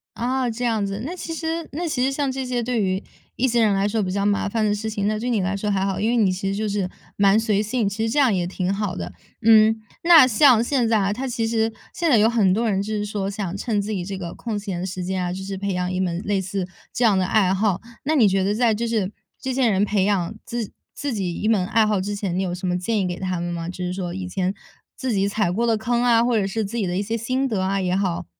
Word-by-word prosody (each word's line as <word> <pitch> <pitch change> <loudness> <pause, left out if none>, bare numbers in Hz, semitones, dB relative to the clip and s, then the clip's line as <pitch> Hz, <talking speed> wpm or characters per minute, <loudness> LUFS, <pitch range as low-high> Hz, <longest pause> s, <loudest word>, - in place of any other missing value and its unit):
啊， 250 +1 0
这 235 +2 -4
样 220 -4 +1
子。 195 +2 -4
那 335 - -4
其 330 -2 -5
实 325 0 -3
那 345 +3 -2
其 270 -5 -1
实 270 - +2
像 275 -1 -1
这 265 0 -4
些 245 -1 -1
对 240 -2 0
于 190 0 -1 0.3
一 260 - +1
些 240 -1 +2
人 215 -3 +4
来 195 +1 +1
说 220 +1 0
比 185 -2 -2
较 200 +1 0
麻 205 0 +1
烦 220 +2 -1
的 205 -1 +2
事 220 +1 -3
情， 205 -1 -1
那 215 0 0
对 245 +3 -2
你 225 -4 +1
来 190 +2 -1
说 210 +1 -2
还 195 -1 +1
好。 195 -1 -1
因 220 +3 +1
为 245 - +2
你 205 -5 +3
其 185 +1 -3
实 195 - -1
就 215 +1 -1
是 200 -2 -1 0.3
蛮 200 +1 +5
随 215 -2 +2
性， 215 0 0
其 220 +3 -3
实 - - -1
这 295 - -2
样 265 -6 +4
也 180 -2 0
挺 185 +1 -2
好 200 -3 -2
的。 - - -5 0.3
嗯， 220 0 +6 0.3
那 335 -5 +9
像 255 -1 +5
现 245 -2 +1
在 225 - +3
啊， 200 -1 +1
它 260 +5 -4
其 230 -2 -1
实 225 0 +1 0.2
现 340 -2 0
在 240 - +5
有 220 +2 +5
很 210 -6 +3
多 225 +3 +1
人 195 -1 +1
就 215 +2 -4
是 210 0 -1
说 200 -2 -3
想 195 -3 -4
趁 210 -2 -1
自 210 - -4
己 190 -4 -2
这 195 0 -5
个 170 -2 -6
空 225 -3 -4
闲 195 -4 -4
的 185 - -3
时 185 -1 -4
间 185 +1 -2
啊， 180 0 -2
就 190 +1 -6
是 195 0 -5
培 200 0 -2
养 180 0 -1
一 185 - -2
门 175 -1 -1
类 205 -1 0
似 190 0 -3 0.3
这 245 - 0
样 215 -4 +4
的 185 - +2
爱 190 -1 +3
好。 195 -1 +1 0.2
那 310 +3 +1
你 245 - +5
觉 195 0 +2
得 205 +2 +1
在 230 -1 +3
就 230 +2 -2
是 210 -4 0 0.3
这 260 - -3
些 255 -2 +2
人 195 -1 +2
培 200 -2 +1
养 195 -2 0
自 235 -3 -4 0.2
自 285 -2 -3
己 190 -5 -2
一 215 - -1
门 200 -5 +2
爱 220 +1 +3
好 210 -2 +1
之 205 +2 -3
前， 190 -3 -2
你 - - +1
有 180 -2 -2
什 185 +1 -6
么 180 0 +1
建 210 +4 -1
议 - - 0
给 175 0 -4
他 185 -2 -2
们 175 0 -3
吗？ 165 -1 -4
就 180 - -6
是 180 - -2
说 180 -2 -4
以 190 0 -4
前 185 0 -1 0.4
自 255 -1 -3
己 200 -2 +1
踩 200 -3 0
过 235 +5 0
的 225 - +3
坑 235 +2 0
啊， 235 -1 +4
或 240 -2 +2
者 195 - 0
是 220 +3 -2
自 210 +4 -4
己 205 -5 0
的 175 - -2
一 200 - +1
些 225 +3 -2
心 255 +4 -1
得 220 -7 -1
啊 195 +1 0
也 180 -1 0
好。 190 -3 -1
205 Hz, 320 characters per minute, -23 LUFS, 190-230 Hz, 0.4 s, 那